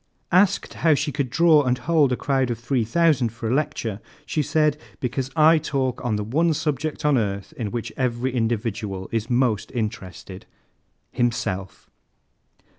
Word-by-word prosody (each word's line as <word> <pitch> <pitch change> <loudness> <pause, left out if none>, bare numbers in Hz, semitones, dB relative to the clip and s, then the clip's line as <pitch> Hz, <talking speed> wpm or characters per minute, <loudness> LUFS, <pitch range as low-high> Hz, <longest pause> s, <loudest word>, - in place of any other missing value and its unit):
Asked 185 +2 +3
how 160 -3 +5
she 145 - -1
could 140 -2 -2
draw 160 +3 +5
and 125 -2 +1
hold 155 -4 +2
a - - +2
crowd 135 -3 0
of 120 - -2
3,000 130 +3 +1
for 115 0 -6
a 115 - 0
lecture, 135 -8 -2 0.3
she 155 - -1
said: 150 +1 +2 0.2
'Because 130 +1 -2
I 160 +1 +6
talk 135 -4 -2
on 120 -4 0
the 105 - -2
one 155 +9 +1
subject 150 0 -2
on 145 -4 +4
earth 100 -2 -3
in 110 -4 -3
which 120 +1 -5
every 125 0 -1
individual 110 -5 -2
is 115 +1 -2
most 120 -4 +1
interested 100 -4 -5 0.6
himself.'" 105 -6 -2
125 Hz, 155 wpm, -23 LUFS, 115-150 Hz, 0.6 s, I